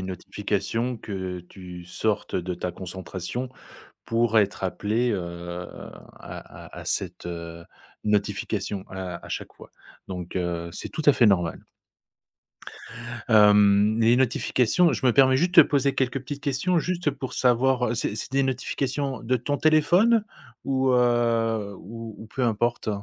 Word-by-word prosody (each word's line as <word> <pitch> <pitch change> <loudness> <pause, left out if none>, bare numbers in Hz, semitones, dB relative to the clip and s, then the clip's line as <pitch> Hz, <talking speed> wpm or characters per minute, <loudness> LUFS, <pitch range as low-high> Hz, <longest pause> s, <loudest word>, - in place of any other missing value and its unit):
une 95 - -5
notification 105 +6 -2
que 95 -4 -5
tu 90 -1 -11
sortes 105 +3 -2
de 90 0 -2
ta 90 +1 -4
concentration 95 +6 -6 0.5
pour 115 -1 +2
être 100 -1 0
appelé, 110 +6 0
heu, 95 - -1
à 85 +1 -9
à - - -10
à - - -9
cette, 90 -2 -3
heu, 85 -1 -7 0.4
notification 100 -1 -1
à 95 -2 -6
à - - -10
chaque - - -5
fois - - -14 0.4
donc 90 -2 -6
heu, 85 -1 -2
c'est - - -5
tout 155 - -4
à 145 - +8
fait 120 - +4
normal. 90 -5 +1 1.6
Hem, 105 0 +5
les 115 +2 +5
notifications 130 +5 +2
je 120 - -3
me 120 - +5
permets 130 0 +5
juste 175 +5 +1
te 165 - +11
poser 140 -2 +2
quelques 130 0 0
petites 140 +2 -7
questions 150 +6 +1
juste 175 -1 -1
pour 130 -2 -6
savoir 125 -1 +2
c'est 105 - -1
c'est 110 +4 -5
des 135 - +3
notifications 135 0 -2
de 130 +3 +1
ton 145 +4 -2
téléphone 175 +10 +4 0.4
ou 130 -1 +1
heu, 115 -4 +2
ou 115 +2 -9
ou 110 - -10
peu 130 +4 -4
importe? 120 0 0
115 Hz, 150 wpm, -25 LUFS, 95-130 Hz, 1.6 s, te